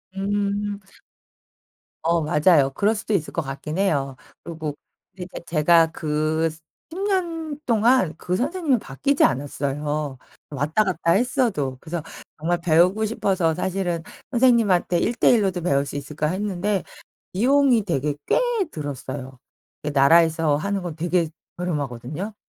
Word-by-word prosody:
음. 205 +1 -1 1.2
어 170 +1 +2
맞아요. 150 -2 +4
그럴 210 +2 +2
수도 215 0 -3
있을 165 -6 0
것 165 - 0
같긴 150 +3 -6
해요. 145 -9 0 0.3
그리고 155 -3 -5 0.4
그러니까 180 -1 -7
제가 165 +1 +4
그 155 +1 0
스 155 - -12 0.3
10 350 - -6
년 330 -6 -2
동안 230 -6 +3
그 180 +2 -2
선생님이 290 - +1
바뀌지 275 - 0
않았어요 145 +1 -1 0.3
왔다 150 +8 +1
갔다 180 -4 0
했어도. 210 - 0
그래서 170 -1 -5 0.3
정말 170 +3 0
배우고 180 +6 +3
싶어서 195 -7 0
사실은 180 -2 -2 0.3
'선생님한테 230 -9 +3
1 235 - 0
대 - - +4
1 230 -4 +4
로도 185 -2 -1
배울 140 -5 +1
수 - - -7
있을까.' 145 +2 -3
했는데 195 +2 -1 0.5
비용이 255 +2 +3
되게 150 -6 -1
꽤 - - +3 0.3
들었어요. 130 -3 -6 0.5
예 - - 0
나라에서 155 +2 +4
하는 195 +5 -2
건 170 -3 -5
되게 170 0 0 0.3
저렴하거든요. 150 - -4
175 Hz, 285 characters per minute, -23 LUFS, 150-205 Hz, 1.2 s, 맞아요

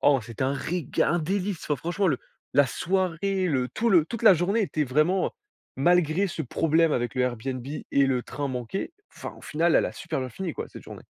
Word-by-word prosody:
Oh 140 -2 +5
c'était 115 +2 -6
un 135 +1 +1
réga 165 +1 -1
un 170 0 +1
délice. 190 +2 -1
Fran 150 - 0
franchement 175 +5 0
le 140 -6 +1 0.4
la 145 -1 +6
soirée, 185 +4 0
le 130 -6 0
tout 230 - -1
le 175 -7 +5
toute 230 +4 -6
la 200 - +9
journée 195 +7 +1
était 155 -5 -1
vraiment, 155 +8 +2
heu - - -3 0.5
malgré 175 +4 +3
ce 165 -3 -4
problème 165 +5 +2
avec 120 -4 -1
le 130 - +1
Airbnb 125 +1 -2
et 140 -1 0
le 125 -2 0
train 140 +1 -4
manqué, 125 - -4 0.2
enfin, - - -6
au - - -15
final, 165 +2 +2
elle - - +3
a - - -5
super - - -4
bien 130 -1 -3
fini 175 +7 -5
quoi - - -5
cette - - -11
journée. - - -10
155 Hz, 220 wpm, -26 LUFS, 135-185 Hz, 0.5 s, la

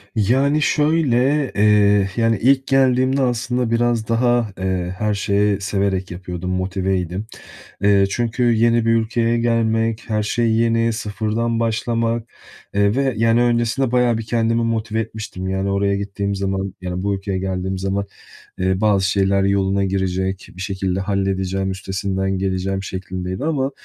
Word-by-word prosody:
Yani, 135 +8 +2
şöyle, 145 -3 +2
eee, 105 -1 +4
yani, 115 -2 +2
ilk 135 +2 +3
geldiğimde 130 0 +3
aslında 125 -1 0
biraz 115 -1 +1
daha, 120 -2 +1
eee, 95 -1 -2
her 105 +1 0
şeyi 100 0 +1
severek 100 -2 -1
yapıyordum, 90 0 -5
motiveydim. 95 0 -2 0.6
Eee, 100 -1 +4
çünkü 120 +2 -1
yeni 115 -1 +3
bir - - +3
ülkeye 115 +1 +1
gelmek, 115 -1 0
her 105 0 +1
şey 115 +2 0
yeni, 115 0 +2
sıfırdan 110 +2 -2
başlamak, 115 0 -1 0.5
eee, 100 +1 +2
ve, 135 -2 +1
yani, 115 +2 +3
öncesinde 120 +1 +1
bayağı 125 -2 +2
bir 115 - -6
kendimi 115 0 +1
motive 110 -1 -1
etmiştim. 105 -4 -6
Yani, 95 +1 -1
oraya 100 0 +1
gittiğim 100 0 -3
zaman, 95 0 -2
yani, 90 0 -4
bu 100 0 0
ülkeye 95 -1 -3
geldiğim 95 0 -3
zaman, 95 +1 -2 0.5
eee, 95 0 0
bazı 100 -3 +2
şeyler 100 0 +2
yoluna 100 0 +1
girecek, 95 0 -2
bir - - -9
şekilde 95 -1 -2
halledeceğim, 95 -1 -1
üstesinden 95 0 -2
geleceğim 95 0 -2
şeklindeydi 95 0 -5
ama 140 -4 0
105 Hz, 140 wpm, -20 LUFS, 95-115 Hz, 0.6 s, eee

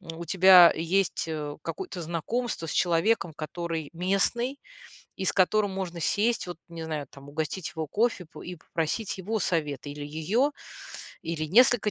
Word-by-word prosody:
у 165 -2 -8
тебя 185 0 +8
есть, 175 +3 0
э, 150 -2 -4
какое-то 370 - -5
знакомство 170 +5 -2
с - - -3
человеком, 175 +1 +2
который 160 0 -4
местный 195 +9 0 0.6
и 190 - -3
с - - +2
которым 200 +2 +3
можно 185 -3 -4
сесть, 220 +4 +1
вот, 175 - -6
не 165 -1 -7
знаю, 155 -3 -3
там, 140 0 -13
угостить 155 +4 -3
его 160 -1 -2
кофе, 215 0 0
п 160 - -13
и 180 - -6
попросить 170 +6 -3
его 215 +4 -2
совет. 150 -7 -1
Или 145 0 -6
ее, 185 - 0 0.7
или 160 -1 -3
несколько 225 +5 +4
175 Hz, 155 wpm, -27 LUFS, 160-200 Hz, 0.7 s, тебя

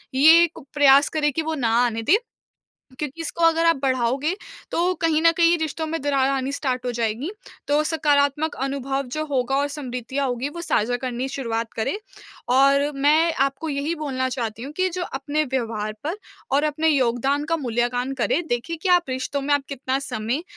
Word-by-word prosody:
ये 320 +5 +7
एक 340 -1 -2
प्रयास 280 -1 +6
करें 300 -1 0
कि 325 - -1
वो 320 0 -2
ना 245 -6 0 0.2
आने 225 -1 -2
दें 315 - +5 0.8
क्योंकि 300 +2 -4
इसको 335 +1 -3
अगर 330 0 +3
आप 330 0 +5
बढ़ाओगे, 260 +5 +1 0.4
तो 355 +2 +1
कहीं 320 -1 +2
न 330 - +6
कहीं 340 0 +4
रिश्तों 315 0 -2
में 325 +1 -2
दरार 275 -2 +1
आनी 270 0 -1
स्टार्ट 255 -3 -2
हो 245 - 0
जाएगी। 235 - -2 0.4
तो 290 +1 +3
सकारात्मक 295 -1 +1
अनुभव 275 0 -2
जो 310 +2 -2
होगा 270 -3 0
और 285 +1 +1
समृद्धियाँ 265 -1 -3
होगी 250 +3 -2
वो 340 +3 -7
साझा 245 -6 +1
करनी 250 0 -3
शुरुआत 230 -4 -3
करे 225 - -1 0.5
और 275 +3 +4
मैं 310 +4 +3
आपको 275 +3 0
यही 290 +4 -2
बोलना 265 -4 -2
चाहती 230 -3 -4
हूँ 280 - -6
कि 370 0 +2
जो 365 +1 -4
अपने 290 +1 -2
व्यवहार 225 -5 -2
पर 320 +5 -2 0.4
और 285 - +3
अपने 310 +1 0
योगदान 270 +1 +1
का 330 - 0
मूल्यांकन 245 0 -1
करे, 335 - +2
देखिए 240 +8 -2
कि 375 - +1
आप 355 -1 +6
रिश्तों 260 +2 -2
में 285 +1 +1
आप 285 -1 +1
कितना 270 -1 -2
समय 245 +2 -3
280 Hz, 185 wpm, -23 LUFS, 255-310 Hz, 0.8 s, ये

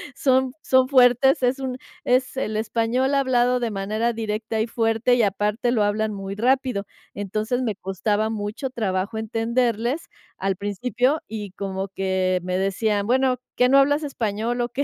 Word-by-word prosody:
son 260 -1 +2
son 260 -1 +4
fuertes, 255 0 +4
es 255 +2 +2
un 260 -1 -3 0.3
es 255 +1 +1
el 220 -4 -2
español 230 +5 0
hablado 250 -2 +2
de 235 - -1
manera 215 +4 -1
directa 220 0 -2
y 225 - -1
fuerte 225 +2 +1
y 235 - +3
aparte 210 +4 0
lo 220 -4 +2
hablan 215 +1 0
muy 195 0 -5
rápido. 250 -2 +1 0.3
Entonces, 215 +5 -2
me 225 -5 -1
costaba 205 +3 -1
mucho 215 +5 -4
trabajo 205 -3 -2
entenderles 235 +4 -1 0.3
al 195 0 -1
principio 245 - 0
y 210 -3 -6
como 195 0 -4
que 190 -1 0
me 180 0 -1
decían: 200 +2 0
"Bueno, 255 0 +2 0.2
¿qué, 250 - +5
no 275 - +5
hablas 290 +2 +3
español 235 -3 -2
o 240 - -1
qué?" 265 +4 -1
225 Hz, 160 wpm, -23 LUFS, 205-250 Hz, 0.3 s, qué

